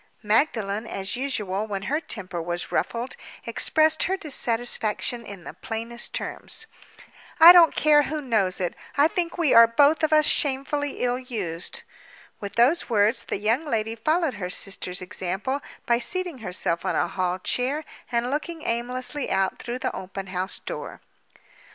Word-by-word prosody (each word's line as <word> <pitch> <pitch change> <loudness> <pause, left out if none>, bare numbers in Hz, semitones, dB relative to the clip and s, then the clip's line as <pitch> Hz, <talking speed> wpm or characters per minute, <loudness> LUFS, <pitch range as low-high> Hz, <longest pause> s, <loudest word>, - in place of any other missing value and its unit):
Magdalen, 215 -2 +1
as 195 0 -3
usual 215 -6 -2
when 200 -2 -4
her 290 +9 0
temper 185 - -5
was 175 +1 -4
ruffled, 240 +2 -2 0.3
expressed 315 0 +2
her 380 +1 0
dissatisfaction 240 - -1
in 200 -5 -10
the - - -8
plainest 230 +1 -5
terms. 450 - -4 0.7
"I 335 +2 +11
don't 340 -3 +6
care 300 -1 +5
who 310 +1 -3
knows 215 -9 +1
it—I 235 - 0
think 340 +1 -2
we 325 -6 +2
are 230 0 +9
both 285 +7 +4
of 315 - +1
us 305 -1 +5
shamefully 285 0 0
ill 245 0 +1
used!" 220 - -5 0.6
With 200 -1 -7
those 260 +9 +3
words, 210 -1 +2
the - - -2
young 225 +8 +1
lady 225 -7 -1
followed 310 +5 0
her 180 - -3
sister's 180 -1 0
example 190 +10 -3 0.2
by 235 0 +2
seating 355 +1 -2
herself 180 -4 -1
on - - -1
a - - +1
hall 185 -1 -1
chair 265 +10 -1 0.3
and 240 +1 0
looking 315 +2 -4
aimlessly 250 +4 -2
out 190 0 0
through 240 +1 -4
the - - -3
open 190 +1 -6
house 185 +2 -2
door. - - -7
235 Hz, 155 wpm, -25 LUFS, 200-295 Hz, 0.7 s, I